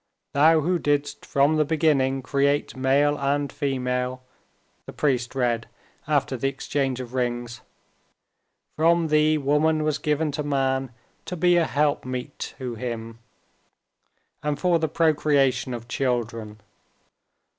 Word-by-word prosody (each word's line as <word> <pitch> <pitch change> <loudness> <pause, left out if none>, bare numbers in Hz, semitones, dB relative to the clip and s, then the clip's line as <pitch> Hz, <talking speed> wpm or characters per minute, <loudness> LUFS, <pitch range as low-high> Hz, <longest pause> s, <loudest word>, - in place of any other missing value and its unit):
"Thou 155 +3 +5
who 175 +3 0
didst 145 -1 -1
from 140 +3 +3
the 155 - +4
beginning 145 -4 +1
create 140 +2 0
male 140 +3 +2
and 140 +1 0
female," 130 -2 -2 0.6
the - - -8
priest 125 -4 0
read 120 -3 0 0.4
after 145 -3 +1
the 130 +2 -1
exchange 135 -1 -2
of 125 -1 -7
rings, 120 -2 -2 1.1
"from 165 +1 +3
Thee 155 0 +3
woman 150 +2 +2
was 150 -1 0
given 150 0 0
to 145 - -3
man 135 -2 0 0.3
to 180 - -5
be 175 +2 +4
a 170 -1 +3
helpmeet 140 -3 -1 0.2
to 125 -2 -5
him, 115 -1 -6 1.2
and 150 -1 -1
for 175 -1 +2
the 160 -1 -1
procreation 145 -5 +2
of 120 -1 -6
children. 115 -5 -2
140 Hz, 125 wpm, -24 LUFS, 125-150 Hz, 1.2 s, Thou